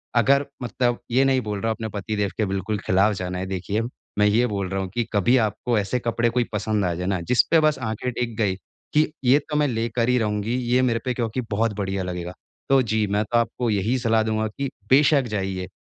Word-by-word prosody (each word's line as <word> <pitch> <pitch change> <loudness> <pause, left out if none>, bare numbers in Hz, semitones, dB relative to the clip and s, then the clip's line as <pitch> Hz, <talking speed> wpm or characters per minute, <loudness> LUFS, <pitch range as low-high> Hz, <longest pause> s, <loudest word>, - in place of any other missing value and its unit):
अगर 140 +4 +4 0.2
मतलब 120 0 0
ये 130 +3 +4
नहीं 130 -1 +3
बोल 105 -2 -4
रहा 115 - -1
हूँ 110 - 0
अपने 110 0 -5
पति 110 +2 -3
देव 100 -2 0
के 110 - +1
बिल्कुल 95 +2 -2
खिलाफ 100 +3 +3
जाना 90 0 -4
है 95 - -3
देखिए 95 +3 -2 0.4
मैं 105 - +5
ये 120 +4 +3
बोल 100 -3 -3
रहा 95 0 -2
हूँ 95 - -4
कि 120 - +1
कभी 110 +5 +3
आपको 110 +1 0
ऐसे 115 +5 -1
कपड़े 115 0 0
कोई 120 +1 +1
पसंद 105 -1 0
आ 85 - 0
जाएँ 90 +2 -3
ना 95 -3 0
जिसपे 125 - +3
बस 155 -1 +3
आँखें 115 +1 -3
टिक 115 -1 -3
गई, 100 -4 +1 0.4
कि 155 0 +3
ये 135 +4 +6
तो 150 +1 -6
मैं 150 -1 +3
लेकर 115 0 -1
ही 125 - +3
रहूँगी, 105 +2 -1
ये 125 0 +1
मेरे 115 -2 +1
पे 125 - 0
क्योंकि 120 +1 -2
बहुत 110 +1 +1
बढ़िया 95 -1 -2
लगेगा। 90 0 -5 0.4
तो 135 -1 +5
जी, 110 -2 0
मैं 105 +2 +1
तो 120 - 0
आपको 120 0 0
यही 110 +5 +1
सलाह 115 -1 +2
दूँगा 110 0 0
कि 140 -1 -2 0.2
बेशक 140 +1 +5
जाइए 95 -2 -2
110 Hz, 230 wpm, -23 LUFS, 100-125 Hz, 0.4 s, ये